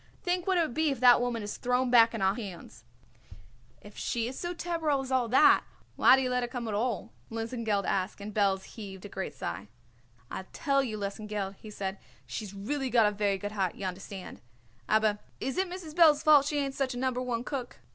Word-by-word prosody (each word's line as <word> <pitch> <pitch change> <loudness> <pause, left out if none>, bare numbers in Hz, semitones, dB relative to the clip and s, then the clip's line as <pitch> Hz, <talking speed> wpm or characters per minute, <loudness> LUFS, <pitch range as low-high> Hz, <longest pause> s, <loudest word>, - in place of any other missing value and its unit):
Think 360 +1 -1
what 380 -1 +3
it - - +4
would 310 -7 -1
be 315 +2 +2
if 270 -4 -2
that 245 -1 +7
woman 240 -3 -1
is 205 - -5
thrown 250 0 +1
back 230 -1 +6
on 210 - -2
our 190 0 +4
hands." 185 - -9 1.0
"If 205 0 -13
she 235 -1 -1
is 255 - -6
so 350 - -3
terrible 330 -5 -1
as 265 - -7
all 255 -2 +2
that 260 +6 +6 0.3
why - - +7
do 265 - 0
you 255 - 0
let 250 0 +1
her 240 - -1
come 240 -1 -5
at 215 - -3
all?" 230 +2 -1 0.2
Lesengeld 225 -3 -2
asked, 190 +1 -1
and 205 +1 -7
Belz 195 -2 +2
heaved 195 -3 -9
a - - -7
great 190 -1 -5
sigh. 100 - -5 0.6
"I'll 190 - -6
tell 275 -1 +1
you, 220 -5 -4
Lesengeld," 200 -1 -4
he 215 - -11
said, 195 -2 -4 0.3
"she's 210 -4 -6
really 265 +7 -2
got 235 -2 +5
a 210 - +3
very 205 -1 0
good 205 +1 -5
heart, 195 -4 -1
y'understand; 190 0 -7 0.5
aber 215 -1 +3 0.2
is 270 - -3
it 380 -1 0
Mrs. 350 -4 -7
Belz's 315 -3 +5
fault 295 -3 +6
she 295 - -1
ain't 275 -1 -1
such 265 -2 -2
a - - -5
A - - -3
Number 255 -1 0
One 240 -2 -2
cook? 255 -2 -5
235 Hz, 220 wpm, -29 LUFS, 205-270 Hz, 1.0 s, that